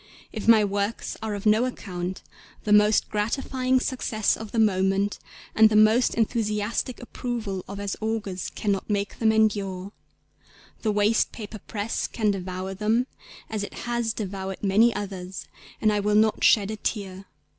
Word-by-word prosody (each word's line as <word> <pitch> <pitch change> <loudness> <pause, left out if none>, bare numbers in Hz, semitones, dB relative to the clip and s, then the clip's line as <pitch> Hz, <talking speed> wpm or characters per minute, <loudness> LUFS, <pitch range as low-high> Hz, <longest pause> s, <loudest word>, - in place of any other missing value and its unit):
If 215 -2 -5
my 220 -2 +7
works 200 +2 -2
are 220 -2 -3
of 200 - -7
no 215 +3 +4
account, 185 -7 -5 0.4
the 210 - +2
most 210 +1 +5
gratifying 255 +4 0
success 230 -5 0
of 220 -1 -8
the - - -4
moment 195 -1 +2 0.3
and 220 0 +6
the 215 - 0
most 215 +3 +5
enthusiastic 220 +1 -1
approval 230 -6 -4
of 200 +1 -7
as 200 -1 -3
augurs 215 -4 -3
cannot 200 -1 -2
make 200 0 -2
them 220 -1 +4
endure. 200 -3 0 0.9
The 220 - +1
waste 210 +2 +2
paper 215 -1 -8
press 210 +3 -3
can 215 -3 0
devour 185 0 -4
them 220 +5 +1 0.4
as 215 -2 -3
it - - -7
has 235 -1 0
devoured 195 -2 -5
many 210 +4 +4
others, 190 -3 -6 0.3
_and 215 - +3
I 210 - +1
will 210 +1 +1
not 215 0 +3
shed 210 -1 +5
a 215 - -5
tear 195 -3 -4
210 Hz, 155 wpm, -25 LUFS, 200-220 Hz, 0.9 s, my